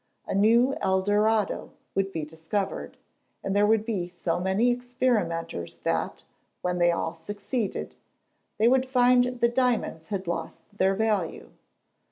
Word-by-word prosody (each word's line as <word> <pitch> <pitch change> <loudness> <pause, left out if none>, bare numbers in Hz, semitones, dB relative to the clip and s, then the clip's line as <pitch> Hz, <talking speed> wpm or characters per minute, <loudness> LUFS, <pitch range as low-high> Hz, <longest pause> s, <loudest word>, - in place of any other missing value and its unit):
A - - -3
new 235 +6 +4
Eldorado 205 +2 +1 0.2
would 195 0 0
be 160 -4 -3
discovered, 165 +6 -4 0.5
and 195 - -1
there 205 +1 +4
would 220 0 +3
be 200 -7 -2
so 175 -1 -2
many 190 +7 +2
experimenters 235 - -1
that, - - -1 0.4
when 180 0 0
they 175 0 +5
all 165 -1 -2
succeeded, 205 +6 -4 0.6
they 220 - +4
would 260 +1 +3
find 250 -1 +4 0.2
that 235 0 +3
diamonds 240 -10 0
had 195 -2 -3
lost 170 +4 -5
their 190 -1 +2
value. 210 -5 -1
205 Hz, 135 wpm, -27 LUFS, 175-235 Hz, 0.6 s, they